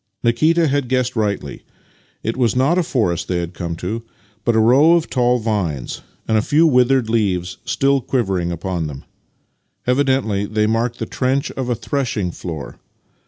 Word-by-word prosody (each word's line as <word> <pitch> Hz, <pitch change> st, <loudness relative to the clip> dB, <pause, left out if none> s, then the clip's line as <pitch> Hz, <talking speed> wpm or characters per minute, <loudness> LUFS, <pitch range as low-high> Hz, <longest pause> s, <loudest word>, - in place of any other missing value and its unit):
Nikita 155 Hz, +8 st, +3 dB
had 140 Hz, -3 st, 0 dB
guessed 125 Hz, -1 st, 0 dB
rightly. 100 Hz, -10 st, -2 dB, 0.6 s
It 115 Hz, -, -1 dB
was 120 Hz, -3 st, +1 dB
not 140 Hz, +8 st, +3 dB
a -, -, +4 dB
forest 105 Hz, -, -1 dB
they 90 Hz, -, -1 dB
had 85 Hz, 0 st, -3 dB
come 85 Hz, -1 st, -4 dB
to, 100 Hz, +7 st, -4 dB, 0.4 s
but 120 Hz, -, +1 dB
a -, -, +4 dB
row 135 Hz, +9 st, +6 dB
of 170 Hz, -2 st, +1 dB
tall 125 Hz, -1 st, +3 dB
vines, 100 Hz, -, -2 dB, 0.3 s
v/ith 110 Hz, -, +2 dB
a -, -, +3 dB
few 150 Hz, +8 st, +3 dB
withered 125 Hz, -4 st, +3 dB
leaves 95 Hz, -6 st, 0 dB
still 135 Hz, 0 st, +2 dB
quivering 95 Hz, -9 st, -1 dB
upon 85 Hz, -1 st, -3 dB
them. 70 Hz, -2 st, -8 dB, 0.8 s
Evidently 125 Hz, -6 st, +1 dB
they 105 Hz, 0 st, +1 dB
marked 115 Hz, +2 st, 0 dB
the -, -, -3 dB
trench 130 Hz, +2 st, -1 dB
of 130 Hz, -2 st, -4 dB
a 120 Hz, -, +1 dB
threshing 115 Hz, -8 st, -2 dB
floor. 80 Hz, -9 st, -7 dB
115 Hz, 165 wpm, -19 LUFS, 95-130 Hz, 0.8 s, row